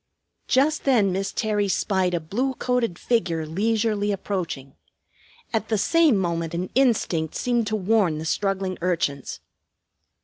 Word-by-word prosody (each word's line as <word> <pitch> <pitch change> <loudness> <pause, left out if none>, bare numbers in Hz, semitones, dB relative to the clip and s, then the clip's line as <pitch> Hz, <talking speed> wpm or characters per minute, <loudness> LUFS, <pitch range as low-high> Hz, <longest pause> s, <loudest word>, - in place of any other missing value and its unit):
Just 285 +5 +2
then 225 -8 +3
Miss 195 +2 -2
Terry 210 -2 0
spied 190 -2 +1
a - - 0
blue 240 +12 -2
coated 245 -9 -1
figure 175 -10 0
leisurely 210 +4 0
approaching. 180 -9 -4 0.8
At 220 -1 -1
the 220 - +2
same 320 - +4
moment 170 -2 -2
an 180 +2 -3
instinct 210 - +1
seemed 240 -3 0
to 215 - 0
warn 200 -5 +2
the 155 - -5
struggling 195 +1 -1
urchins. 165 -6 -2
200 Hz, 135 wpm, -24 LUFS, 175-225 Hz, 0.8 s, same